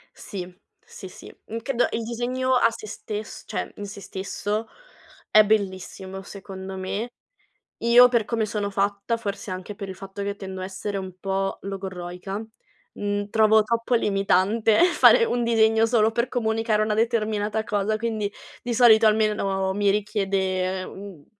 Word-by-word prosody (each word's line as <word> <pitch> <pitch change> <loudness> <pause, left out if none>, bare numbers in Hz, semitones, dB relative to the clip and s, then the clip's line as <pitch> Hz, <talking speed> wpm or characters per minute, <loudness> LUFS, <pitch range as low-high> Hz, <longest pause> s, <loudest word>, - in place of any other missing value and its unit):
Sì, 185 -3 -7 0.3
sì, 190 - -10
sì. - - -12
Mh, 225 - -5
credo 245 +1 0
il 225 - -2
disegno 250 +3 -1
a 230 -2 +5
se 220 - -9
stess 215 0 -6
cioè, - - -4
in 205 - -5
se 200 0 -9
stesso, 205 +4 -4 0.6
è 215 0 +7
bellissimo 190 -2 -2
secondo 190 -1 -8
me. 200 +5 -4 0.7
Io 240 +2 +7
per 235 -4 +1
come 225 -1 0
sono 205 -1 -2
fatta, 200 +3 -1
forse 200 -3 -5
anche 185 +3 -6
per 200 - -6
il 190 - -6
fatto 195 +1 -7
che 200 0 -3
tendo 190 -1 -7
a - - -3
essere 195 +1 -4
un 190 -1 -6
po' 195 0 -1
logorroica, 190 +1 -6 0.5
mhmm, 205 0 -2
trovo 220 0 +5
troppo 230 +2 -1
limitante 210 - +3
fare 365 +6 +6
1 240 - 0
disegno 225 -1 +4
solo 225 -1 +3
per 235 +2 0
comunicare 225 -3 0
una 215 0 0
determinata 220 -1 0
cosa, 210 +1 0
quindi 215 -3 -2 0.3
di 240 -1 -3
solito 225 -2 +6
almeno 200 -3 +1
mi 205 0 +2
richiede, 190 -2 0
ehm, - - -7
uhm, 190 -6 -11
210 Hz, 155 wpm, -24 LUFS, 195-225 Hz, 0.7 s, è